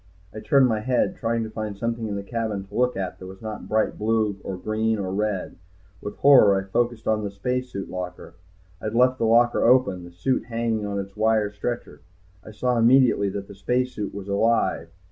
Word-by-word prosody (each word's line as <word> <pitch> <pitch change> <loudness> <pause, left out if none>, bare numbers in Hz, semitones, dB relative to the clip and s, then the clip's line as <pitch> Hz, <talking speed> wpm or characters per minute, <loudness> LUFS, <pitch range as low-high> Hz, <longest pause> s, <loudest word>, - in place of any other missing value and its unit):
I 110 - -6
turned 135 +4 +4
my 110 -3 0
head, 125 +10 0
trying 115 -5 -1
to 110 - -6
find 110 -2 -5
something 115 +1 -2
in 105 - -3
the 100 - -4
cabin 110 -2 -3
to - - -20
look 125 -3 +1
at 95 -2 -4
that 95 - -9
was 95 0 -11
not 110 -1 -7
bright 110 0 0
blue 110 -1 +1
or 95 - -5
green 110 +3 -1
or 95 -2 -3
red. 105 -2 -2 0.4
With 105 - -6
horror 125 -8 +6
I - - -4
focused 120 +3 -1
on 110 -1 +1
the 100 - -2
spacesuit 125 0 -3
locker. 90 -1 -7 0.5
I - - -8
had 110 +1 -3
left 125 +1 +3
the 115 - +1
locker 120 +2 +4
open, 120 -7 +3
the 85 - -11
suit 90 +10 -1
hanging 115 -3 -2
on 100 0 -3
its 100 0 -7
wire 110 -1 +2
stretcher. 120 +4 -5 0.4
I - - -11
saw 120 +3 0
immediately 120 -4 +4
that 100 0 -5
the 100 - -10
spacesuit 110 +2 -2
was 100 -1 -8
alive. 100 -4 +1
110 Hz, 205 wpm, -24 LUFS, 100-120 Hz, 0.5 s, horror